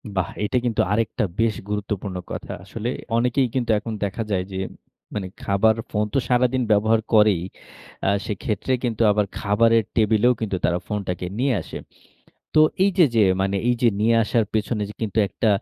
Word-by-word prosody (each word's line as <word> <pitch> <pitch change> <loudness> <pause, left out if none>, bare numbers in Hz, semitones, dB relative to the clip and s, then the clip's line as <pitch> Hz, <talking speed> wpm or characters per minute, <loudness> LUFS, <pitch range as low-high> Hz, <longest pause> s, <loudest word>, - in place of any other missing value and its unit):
বাহ! 95 - 0
এইটা 115 +5 0
কিন্তু 115 -3 +1
আরেকটা 115 +2 0 0.2
বেশ 115 -2 +2
গুরুত্বপূর্ণ 105 -2 -3 0.2
কথা। - - -6
আসলে 110 +5 -5 0.3
অনেকেই 125 +2 +2
কিন্তু 125 -3 -1
এখন 110 +1 -6
দেখা 100 +3 -2
যায় 95 -2 +1
যে, 95 - -5 0.6
মানে 100 -3 -3 0.2
খাবার 105 +3 +3
ফোন 105 0 0
তো - - +2
সারাদিন 125 +1 +2
ব্যবহার 110 +2 +3
করেই। 105 -5 +5 0.7
আ - - +4 0.2
সেক্ষেত্রে 105 +3 -3
কিন্তু 115 -2 -1
আবার 105 0 +2
খাবারের 115 +3 +3
টেবিলেও 110 +2 +3
কিন্তু 105 -3 -1
তারা 90 - +1
ফোনটাকে 95 -4 -3
নিয়ে 135 +1 +2
আসে। - - -8 0.8
তো - - +8 0.2
এই 200 - +4
যে 175 - +8
যে 110 - +6 0.2
মানে 100 +1 0
এই 125 - +4
যে 120 - +6
নিয়ে 115 +2 +3
আসার 115 +1 +1
পেছনে 110 0 0
যে - - -10
কিন্তু 110 0 -2
একটা 115 - -1
110 Hz, 175 wpm, -23 LUFS, 100-115 Hz, 0.8 s, তো